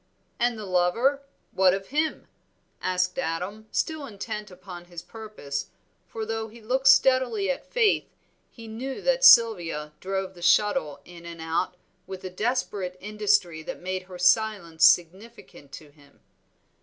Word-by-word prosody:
"And 240 Hz, -1 st, +1 dB
the 215 Hz, -, -7 dB
lover, 195 Hz, +10 st, +1 dB, 0.3 s
what 190 Hz, -1 st, +3 dB
of 195 Hz, 0 st, -8 dB
him?" 305 Hz, +3 st, -1 dB, 0.5 s
asked 180 Hz, +3 st, -1 dB
Adam, 200 Hz, +2 st, -4 dB
still 315 Hz, -3 st, -2 dB
intent 210 Hz, -1 st, -6 dB
upon 180 Hz, -1 st, -11 dB
his 175 Hz, -1 st, -10 dB
purpose, 210 Hz, -11 st, -7 dB, 0.4 s
for, 220 Hz, +2 st, -5 dB
though 225 Hz, 0 st, -3 dB
he 225 Hz, +2 st, -14 dB
looked 260 Hz, +4 st, -1 dB
steadily 265 Hz, -, +4 dB
at -, -, -6 dB
Faith, 455 Hz, -4 st, +2 dB, 0.4 s
he 230 Hz, -2 st, -13 dB
knew 255 Hz, +5 st, -6 dB
that -, -, +1 dB
Sylvia 175 Hz, -, +5 dB
drove 190 Hz, 0 st, -3 dB
the 175 Hz, -, -15 dB
shuttle 170 Hz, -6 st, +2 dB
in 175 Hz, -1 st, -13 dB
and 170 Hz, -1 st, -9 dB
out 165 Hz, +3 st, -2 dB, 0.3 s
with 190 Hz, -1 st, -8 dB
a 185 Hz, -, -6 dB
desperate 205 Hz, -3 st, -2 dB
industry 205 Hz, -5 st, 0 dB
that 160 Hz, -, -7 dB
made 185 Hz, +1 st, -4 dB
her 180 Hz, -, -9 dB
silence 180 Hz, -3 st, +2 dB
significant 180 Hz, -4 st, 0 dB
to 150 Hz, -2 st, -11 dB
him. 145 Hz, -1 st, -23 dB
195 Hz, 145 wpm, -26 LUFS, 175-230 Hz, 0.5 s, Sylvia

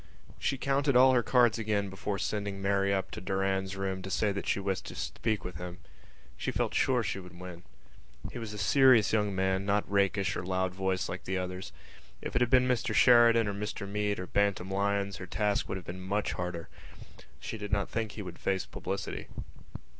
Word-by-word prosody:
She 135 Hz, -, 0 dB
counted 140 Hz, +1 st, +1 dB
all 130 Hz, +1 st, +7 dB
her 125 Hz, -, +4 dB
cards 120 Hz, -2 st, +3 dB
again 105 Hz, -2 st, 0 dB
before 100 Hz, +1 st, -3 dB
sending 100 Hz, -1 st, -2 dB
Mary 100 Hz, 0 st, +1 dB
up 95 Hz, -1 st, -1 dB
to -, -, -6 dB
Mr -, -, -14 dB
Doran's 95 Hz, 0 st, 0 dB
room 95 Hz, -1 st, -2 dB
to 95 Hz, -, -6 dB
say 105 Hz, +2 st, +1 dB
that 100 Hz, 0 st, -4 dB
she -, -, +1 dB
wished 95 Hz, -1 st, -2 dB
to -, -, -8 dB
speak 110 Hz, -2 st, -2 dB
with 90 Hz, -3 st, -6 dB
him. 90 Hz, +1 st, -7 dB, 0.6 s
She 65 Hz, -, -3 dB
felt -, -, -1 dB
sure 125 Hz, -3 st, +2 dB
she 100 Hz, -, -2 dB
would 90 Hz, -1 st, -12 dB
win. 90 Hz, -2 st, -8 dB, 0.7 s
He -, -, -6 dB
was 110 Hz, -2 st, -5 dB
a 105 Hz, -, -7 dB
serious 120 Hz, +1 st, +5 dB
young 105 Hz, -2 st, +1 dB
man, 95 Hz, 0 st, +1 dB
not 100 Hz, +1 st, +1 dB
rakish 100 Hz, -1 st, +1 dB
or -, -, -3 dB
loud 95 Hz, 0 st, -1 dB
voiced 95 Hz, -1 st, -1 dB
like -, -, -6 dB
the 95 Hz, 0 st, -1 dB
others. 90 Hz, 0 st, -4 dB, 0.5 s
If -, -, -6 dB
it 120 Hz, -, +2 dB
had 120 Hz, -, +3 dB
been 125 Hz, 0 st, +5 dB
Mr 125 Hz, -2 st, 0 dB
Sheridan 115 Hz, -2 st, +6 dB
or 100 Hz, -, -1 dB
Mr 105 Hz, 0 st, -4 dB
Meade 105 Hz, 0 st, -1 dB
or 90 Hz, -, -4 dB
Bantam 100 Hz, -1 st, 0 dB
Lyons 100 Hz, 0 st, 0 dB
her 95 Hz, -, -8 dB
task 105 Hz, +2 st, 0 dB
would 95 Hz, -, -2 dB
have 90 Hz, -, -9 dB
been 90 Hz, +2 st, -7 dB
much 100 Hz, +3 st, -1 dB
harder. 90 Hz, -2 st, -4 dB, 0.7 s
She 110 Hz, -, -6 dB
did 105 Hz, 0 st, -6 dB
not 100 Hz, -1 st, +1 dB
think 110 Hz, -2 st, -3 dB
he 105 Hz, -, -6 dB
would 90 Hz, -2 st, -9 dB
face 95 Hz, -1 st, 0 dB
publicity. -, -, -5 dB
100 Hz, 210 wpm, -30 LUFS, 95-110 Hz, 0.7 s, all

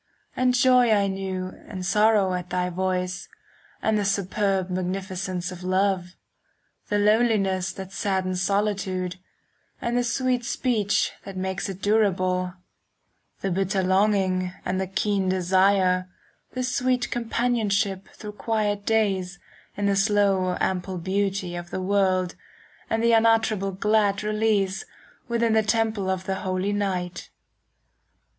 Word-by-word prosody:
And 250 Hz, 0 st, +2 dB
joy 250 Hz, -1 st, +5 dB
I 205 Hz, -2 st, +4 dB
knew 190 Hz, -1 st, -3 dB, 0.2 s
and 185 Hz, -3 st, -6 dB
sorrow 210 Hz, -1 st, +3 dB
at 180 Hz, -1 st, -4 dB
thy 180 Hz, 0 st, -1 dB
voice, 185 Hz, 0 st, -2 dB, 0.5 s
And 220 Hz, -1 st, +2 dB
the -, -, 0 dB
superb 195 Hz, -1 st, 0 dB
magnificence 185 Hz, 0 st, -3 dB
of 180 Hz, -1 st, -9 dB
love,— 185 Hz, -1 st, 0 dB, 0.7 s
The 205 Hz, -, +1 dB
loneliness 205 Hz, -3 st, +2 dB
that 190 Hz, -1 st, -8 dB
saddens 190 Hz, -2 st, -1 dB
solitude, 190 Hz, -2 st, -1 dB, 0.6 s
10 -, -, -2 dB
And 240 Hz, -, 0 dB
the -, -, +1 dB
sweet 250 Hz, 0 st, 0 dB
speech 225 Hz, -4 st, 0 dB
that 195 Hz, -1 st, -8 dB
makes 190 Hz, +1 st, -3 dB
it 195 Hz, 0 st, -8 dB
durable,— 185 Hz, -4 st, +1 dB, 0.9 s
The 195 Hz, -, -1 dB
bitter 190 Hz, +1 st, 0 dB
longing 190 Hz, -1 st, +2 dB
and 185 Hz, +1 st, -1 dB
the 190 Hz, -, -2 dB
keen 195 Hz, 0 st, 0 dB
desire, 185 Hz, 0 st, +2 dB, 0.4 s
The 255 Hz, -, -2 dB
sweet 250 Hz, 0 st, 0 dB
companionship 220 Hz, -5 st, 0 dB
through 210 Hz, -, -8 dB
quiet 210 Hz, -1 st, -1 dB
days 195 Hz, -4 st, +1 dB, 0.4 s
In 205 Hz, -, -1 dB
the 200 Hz, 0 st, +2 dB
slow 195 Hz, -3 st, +2 dB
ample 185 Hz, 0 st, -1 dB
beauty 190 Hz, 0 st, -1 dB
of 175 Hz, 0 st, -6 dB
the -, -, -4 dB
world, 185 Hz, -2 st, +1 dB, 0.6 s
And 225 Hz, 0 st, 0 dB
the 235 Hz, -, +4 dB
unutterable 225 Hz, -3 st, +3 dB
glad 205 Hz, +1 st, +1 dB
release 210 Hz, -2 st, +1 dB
15 -, -, -11 dB, 0.4 s
Within 235 Hz, -1 st, +1 dB
the 220 Hz, -, +4 dB
temple 220 Hz, -2 st, 0 dB
of 190 Hz, -1 st, -1 dB
the 190 Hz, 0 st, -2 dB
holy 185 Hz, +2 st, -1 dB
night. 185 Hz, -3 st, -2 dB
195 Hz, 135 wpm, -25 LUFS, 185-215 Hz, 0.9 s, joy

